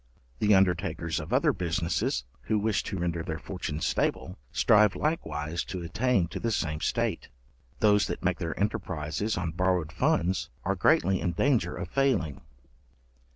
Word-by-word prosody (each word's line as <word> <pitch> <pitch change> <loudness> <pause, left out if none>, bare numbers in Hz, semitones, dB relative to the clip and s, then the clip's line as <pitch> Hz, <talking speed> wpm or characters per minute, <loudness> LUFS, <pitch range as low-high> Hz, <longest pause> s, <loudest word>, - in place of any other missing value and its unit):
The 105 -1 +4
undertakers 90 -4 +1
of - - -7
other - - +3
businesses, 85 -7 -1 0.2
who 110 - +1
wish 105 -2 +1
to 95 - -3
render 85 -1 -1
their 80 -1 -4
fortune 85 -5 -5
stable, 90 +2 -1
strive 105 -1 +4
likewise 80 - -2
to 90 -2 -5
attain 105 +1 +1
to - - -5
the 115 - -1
same 80 -8 -1
state. - - -1 0.5
Those 105 -1 +4
that - - -5
make - - 0
their 80 -1 -3
enterprizes 95 -1 -2
on 85 -2 -2
borrowed 90 -2 0
funds, 90 +4 +1
are - - +1
greatly 95 +1 +3
in 85 - -1
danger 110 -5 +1
of 90 - -5
failing. 90 - 0
90 Hz, 155 wpm, -28 LUFS, 80-105 Hz, 0.5 s, The